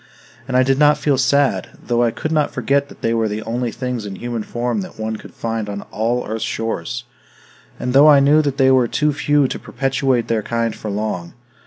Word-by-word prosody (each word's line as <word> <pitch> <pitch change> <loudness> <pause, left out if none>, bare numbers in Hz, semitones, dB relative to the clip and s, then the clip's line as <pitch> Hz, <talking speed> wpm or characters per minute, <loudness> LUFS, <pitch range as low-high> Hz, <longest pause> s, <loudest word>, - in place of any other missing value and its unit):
And 130 -1 +1
I 130 - +5
did 135 +1 +1
not 150 0 +5
feel 145 -2 +1
sad, 140 +2 +2
though 120 -1 0
I 120 - +3
could 155 +7 -4
not 155 -2 +2
forget 140 +3 0
that - - -16
they 115 - +1
were 115 -1 +1
the 105 +1 -4
only 120 +1 -2
things 125 -2 -4
in 100 -2 -6
human 120 +2 -4
form 120 - -2
that 185 - -10
one 110 0 -3
could - - -13
find 115 -2 -3
on 100 0 -5
all 120 +3 -1
earth's 110 +1 -3
shores, 115 +1 -3 0.8
and 125 - -2
though 140 +3 +7
I 145 -2 +7
knew 145 +3 +5
that 140 -3 -2
they 130 -1 +4
were 130 -2 +4
too 150 +4 +1
few 145 -1 +2
to - - -5
perpetuate 130 -2 0
their 115 -2 0
kind 115 +1 -2
for 110 - -6
long. 100 -4 -3
120 Hz, 220 wpm, -19 LUFS, 115-140 Hz, 0.8 s, though